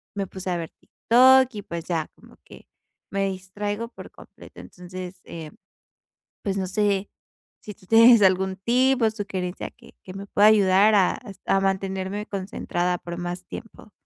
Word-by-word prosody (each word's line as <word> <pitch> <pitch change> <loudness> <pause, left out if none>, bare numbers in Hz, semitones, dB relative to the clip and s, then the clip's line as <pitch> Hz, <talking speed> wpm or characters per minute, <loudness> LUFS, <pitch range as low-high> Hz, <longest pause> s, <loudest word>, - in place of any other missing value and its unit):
me 195 -1 -3
puse 190 0 -7
a 175 - -1
ver 165 -1 -6
TikTok, 260 +2 +4
y, 205 - -5
pues 170 -3 -7
ya, 165 -3 -2
como - - -19
que, - - -16 0.4
me 195 0 0
distraigo 205 +4 -5
por - - -12
completo, - - -15
entonces, 180 0 -10
eh, 160 -2 -9 0.9
pues 200 -1 -2
no 190 -1 -2
sé, 200 0 0 0.5
si 210 - -9
tú 185 - -22
tienes 230 0 +7
algún 190 0 +2
tipo 250 +4 +2
de 220 - +2
sugerencia 195 -4 -5
que - - -19
que 185 - -10
me 195 +1 -8
pueda 205 +1 +4
ayudar 205 0 +5
a 190 -3 +2
es 195 - -12
a 195 - +2
mantenerme 195 +1 -2
concentrada 180 -2 -2
por 175 0 -7
más 175 0 -5
tiempo. 225 -1 -11
195 Hz, 165 wpm, -24 LUFS, 185-210 Hz, 0.9 s, tienes